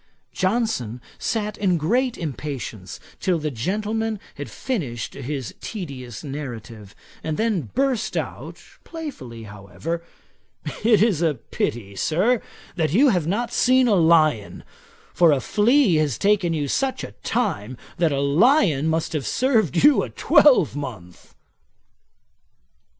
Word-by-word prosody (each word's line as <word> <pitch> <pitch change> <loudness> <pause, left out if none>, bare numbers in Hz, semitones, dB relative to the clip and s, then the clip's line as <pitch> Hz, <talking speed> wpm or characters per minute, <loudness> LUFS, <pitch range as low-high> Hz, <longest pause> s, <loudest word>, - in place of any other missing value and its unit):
Johnson 185 - -1 0.2
sat 210 -2 -2
in 185 -4 +2
great 240 - 0
impatience 130 - -6 0.2
till 185 -3 +1
the 150 -1 -3
gentleman 215 - -2
had 145 - -7
finished 140 - -4
his 135 -2 -5
tedious 135 - -7
narrative, 115 -8 -7 0.3
and 155 -1 -2
then 210 - 0
burst 255 -5 0
out - - -5 0.2
(playfully 245 - -8
however,) 105 - -6 0.8
'It 220 -2 +5
is 200 -8 +1
a 160 -4 +2
pity, 110 -3 -4
Sir, 200 - +1 0.4
that 160 -3 0
you 270 +8 +5
have 175 -8 +1
not 230 +7 -1
seen 255 0 +4
a 220 - +3
lion; 160 - +3 0.5
for 170 -2 +5
a 140 - +3
flea 210 - +3
has 150 -5 0
taken 200 -4 +2
you 150 -3 -1
such 265 - -1
a - - -6
time, 130 - -2 0.2
that 165 -3 +2
a 140 -1 0
lion 155 - +3
must 160 0 -1
have 150 -4 -2
served 235 - +1
you 295 0 +6
a - - -4
twelve 255 - +4
month.' 110 -12 -8
165 Hz, 130 wpm, -23 LUFS, 130-220 Hz, 0.8 s, you